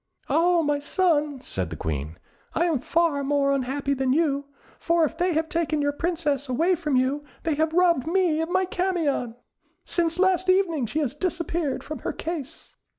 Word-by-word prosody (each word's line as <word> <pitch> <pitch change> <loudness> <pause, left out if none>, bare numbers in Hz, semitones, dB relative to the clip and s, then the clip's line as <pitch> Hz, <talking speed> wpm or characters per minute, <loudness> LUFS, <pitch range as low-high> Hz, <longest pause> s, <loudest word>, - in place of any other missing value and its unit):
"Ah, 340 0 +3
my 290 -1 +1
son," 295 -3 +1
said 95 - -3
the 80 - -6
Queen, 75 +1 -4 0.4
"I 340 - +2
am 325 -6 +1
far 315 +1 +1
more 280 0 +2
unhappy 275 +1 -1
than 265 -1 +1
you, 285 -2 +1 0.3
for 335 0 +2
if 310 - 0
they 360 0 +1
have 320 +1 0
taken 320 -2 -1
your 285 0 +1
Princess 295 -4 -1
away 330 +9 +2
from 305 -5 -1
you, 265 +3 +1 0.2
they 320 - +1
have 315 +2 +1
robbed 340 -5 +3
me 340 -3 +2
of 325 - -2
my 375 +1 +2
Camion. 340 -10 -1 0.5
Since 335 -1 0
last 375 0 +2
evening, 340 -9 +2
she 310 +8 -1
has 270 -4 -1
disappeared 335 -2 -2
from 310 - -6
her - - -3
case!" 320 -2 -6
310 Hz, 180 wpm, -25 LUFS, 280-340 Hz, 0.5 s, Ah